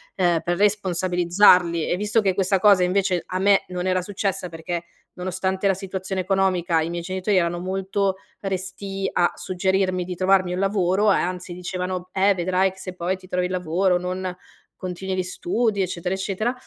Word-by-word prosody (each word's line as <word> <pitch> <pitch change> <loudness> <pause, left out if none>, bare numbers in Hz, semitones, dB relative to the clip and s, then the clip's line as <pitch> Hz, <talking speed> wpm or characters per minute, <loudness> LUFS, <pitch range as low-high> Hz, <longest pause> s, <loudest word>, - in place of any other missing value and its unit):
ehm, 175 -3 +2
per 175 0 -1
responsabilizzarli 180 -3 +3
e - - +2
visto 210 +3 +1
che 190 -2 +1
questa 195 -1 +2
cosa 200 -2 +5
invece 185 -1 +1
a 185 - -3
me 200 0 +4
non 180 0 -3
era 185 0 +1
successa, 195 -1 -3
perché 165 +1 -4 0.3
nonostante 190 +2 -2
la 195 - +4
situazione 190 0 -4
economica 185 -3 +1
i 165 - -2
miei 170 0 -4
genitori 185 +2 0
erano 175 0 +1
molto 190 +1 -1 0.3
restii 195 0 -3
a 175 - +3
suggerirmi 185 0 0
di 180 -1 -5
trovarmi 185 0 +2
un 180 - -2
lavoro 195 +1 +2
e - - +3
anzi, 180 0 -3
dicevano: 180 0 -4
"Eh, 195 +1 +4
vedrai 185 +2 +1
che 190 - -17
se 185 -1 -7
poi 180 +2 -1
ti 185 0 -16
trovi 180 0 0
il 185 - -8
lavoro 180 +1 +1
non 180 0 -4 0.4
continui 185 +1 -4
gli 185 - 0
studi", 200 +3 -1
eccetera, 180 0 -3
eccetera. 200 +5 -2
185 Hz, 175 wpm, -23 LUFS, 180-195 Hz, 0.4 s, cosa